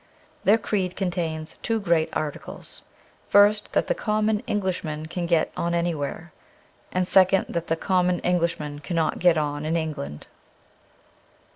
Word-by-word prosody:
Their 210 +3 +6
creed 195 -4 -2
contains 170 -4 -3
two 225 -1 0
great 170 -5 +2
articles: 150 -2 -5 0.5
first, 205 +1 +4
that - - +2
the - - +1
common 215 - 0
English 190 -3 -1
man 155 -1 -4
can 170 +1 -4
get 170 -2 +2
on 170 0 -1
anywhere; 170 -1 -2 0.6
and 185 0 0
second, 190 0 +5
that 170 0 -3
the 165 - +1
common 180 0 +2
Englishman 170 -4 -1
cannot 160 +1 -1
get 175 -2 +4
on 145 -1 -1
in 160 +2 0
England. 150 - -4
170 Hz, 140 wpm, -25 LUFS, 160-190 Hz, 0.6 s, Their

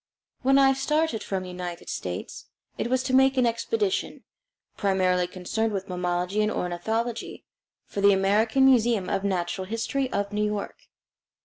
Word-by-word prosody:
When 270 +1 +4
I 270 -1 +6
started 300 -2 0
from 190 -2 -3
the 185 - -8
United 180 -1 -6
States, 90 -1 -5 0.3
it - - -2
was 255 +1 +1
to 260 - -2
make 265 +1 +5
an 255 - +4
expedition, 385 - -1 0.5
primarily 185 -2 +1
concerned 210 +5 -2
with 195 -1 -3
mammalogy 180 +2 -1
and 210 - +2
ornithology, 220 +7 -3 0.4
for 200 - -5
the 200 0 +6
American 210 +7 +3
Museum 235 -7 +3
of 195 0 -1
Natural 185 -1 -1
History 245 +5 -2
of 200 0 -2
New 210 0 +1
York. 210 -1 -4
210 Hz, 150 wpm, -26 LUFS, 185-255 Hz, 0.5 s, I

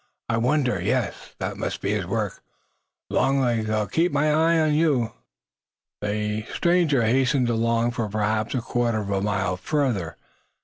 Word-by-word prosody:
I 115 - +1
wonder? 125 - +1
Yes! 115 +3 -2
That - - -4
must - - -3
be - - -1
his - - -1
work! - - -2 0.7
Long 135 +1 +2
legs, 115 -4 0
I'll 110 -1 +1
keep 165 - +1
my 150 +1 +2
eyes 165 +1 +3
on 155 -1 +2
you!" 145 -8 +2 0.9
The 105 +1 -2
stranger 170 -7 +3
hastened 130 +2 +2
along 115 +1 +1
for 115 -3 -3
perhaps 110 +3 -1
a 125 - 0
quarter 115 -2 0
of 100 -1 -5
a 95 -1 0
mile 95 -2 -1
further. 120 - -1
115 Hz, 160 wpm, -24 LUFS, 105-140 Hz, 0.9 s, eyes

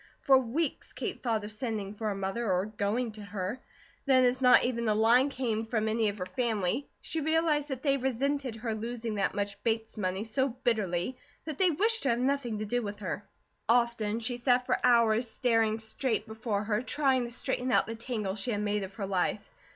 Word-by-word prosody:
For 270 - +5
weeks 265 +5 -2
Kate - - -4
thought 225 -4 0
of 210 - -6
sending 215 -3 -3
for 215 +1 -4
her 205 - -1
mother, 195 +3 -2
or 185 +1 +1
going 215 +3 -1
to 215 0 -9
her; 200 +4 -4 0.5
then 260 -1 +6
as 250 +1 +2
not 250 -1 +7
even 235 -2 -1
a 210 - +3
line 235 +5 +5
came 230 -5 -2
from 220 -1 0
any 220 0 +2
of 205 - -5
her 180 - -3
family, 220 +3 -1
she 320 - -3
realized 310 -1 +1
that 265 -2 -4
they 275 -2 +3
resented 265 0 -1
her 225 0 -3
losing 230 +1 -4
that - - 0
much 205 0 -3
Bates 225 -1 -1
money 190 0 -1
so 260 +5 0
bitterly 215 -1 0 0.3
that 310 -3 -5
they 375 -2 +5
wished 440 +8 +2
to 275 - 0
have 235 - +2
nothing 255 -3 0
to 215 - -3
do 245 +4 0
with 205 -2 -5
her. 200 0 -4 0.5
Often 235 -2 +2
she 245 +1 -2
sat 250 0 +2
for - - 0
hours 235 -1 +4
staring 225 -3 +2
straight 220 0 -1
before 220 -2 -2
her, 210 +1 0
trying 260 -1 +1
to - - -6
straighten 255 +1 -1
out - - +4
the 225 - -5
tangle 225 -4 -3
she 215 +4 -3
had 210 -3 0
made 210 0 0
of 195 0 -7
her 200 - -3
life. 195 +2 -1
230 Hz, 210 wpm, -30 LUFS, 210-255 Hz, 0.5 s, not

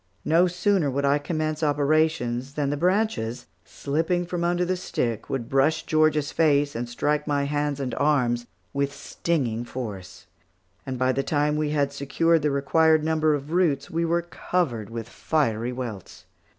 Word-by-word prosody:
No 170 +3 +4
sooner 180 -2 +1
would 140 +1 -1
I 140 +1 +3
commence 155 0 -2
operations 145 -4 +1
than 145 -2 0
the - - 0
branches, 175 - 0 0.2
slipping 165 +5 -1
from 175 0 -3
under 175 +1 +1
the 185 +1 0
stick, 120 - -3
would 125 -4 -3
brush 140 +4 +2
Georgia's 155 -2 +2
face, 145 -2 +2
and 120 +1 -3
strike 150 +5 -1
my 145 -1 +1
hands 145 0 -1
and 130 -2 -3
arms 125 -5 +1 0.3
with 140 0 0
stinging 130 -6 -2
force, 110 -7 -7 0.6
and 130 -1 -3
by 130 +1 +2
the 135 - 0
time 150 +1 0
we 150 -1 0
had 140 -2 0
secured 160 +4 +1
the 150 - +1
required 155 +3 +3
number 155 -1 +2
of 145 +1 -6
roots, 160 -6 +1
we 165 +1 0
were 170 +1 +1
covered 160 - -2
with 115 -1 -6
fiery 120 -5 -1
welts. 120 -7 -7
145 Hz, 165 wpm, -25 LUFS, 130-160 Hz, 0.6 s, No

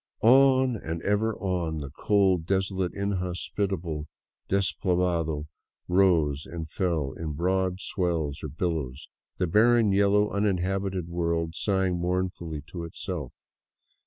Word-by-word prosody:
On 130 +1 +5
and 80 -3 -4
ever 105 +2 +1
on 90 -5 -2
the 70 -3 -6
cold, 95 -1 +2
desolate, 95 -1 0
inhospitable 90 -4 -2 0.4
despoblado 90 -5 +1 0.4
rose 85 -6 +3
and 80 -2 -6
fell 80 -5 -1
in 80 -2 -5
broad 90 +3 0
swells 85 -7 -1
or - - -2
billows, 75 -6 -3 0.3
the - - +1
barren, 110 +4 +4
yellow, 100 +1 +3
uninhabited 95 -2 -1
world 85 -1 -1
sighing 95 -2 0
mournfully 90 -4 -2
to 85 -1 -6
itself. 85 - -5
90 Hz, 110 wpm, -27 LUFS, 80-100 Hz, 0.4 s, On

